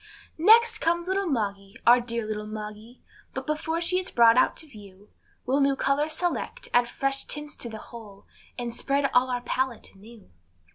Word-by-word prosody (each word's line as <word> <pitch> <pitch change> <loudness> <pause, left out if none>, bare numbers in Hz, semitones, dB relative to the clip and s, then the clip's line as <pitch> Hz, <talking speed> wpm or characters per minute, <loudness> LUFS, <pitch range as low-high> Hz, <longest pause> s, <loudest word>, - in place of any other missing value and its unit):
Next 455 +7 +6
comes 340 +1 0
little 385 +1 0
Moggy, 200 -7 -3
our 240 +1 +7
dear 235 -1 -3
little 210 0 -4
Moggy, 215 +2 -9 0.3
But - - -4
before 320 +2 -2
she 355 +2 +1
is 370 - -3
brought 230 -1 +5
out 255 - +3
to 320 - -3
view, 205 -5 -15 0.3
We'll 270 +3 +1
new 275 0 +3
colors 290 +3 0
select, 355 +8 -3
add 240 0 +3
fresh 275 +1 -2
tints 295 0 -4
to 235 - -5
the 220 - -7
whole, 215 -3 -12 0.3
And 240 -2 -4
spread 275 +2 0
all 250 +1 +4
on 250 - 0
our 245 - -4
pallet 255 0 -3
anew. 210 - -16
250 Hz, 185 wpm, -26 LUFS, 220-305 Hz, 0.3 s, our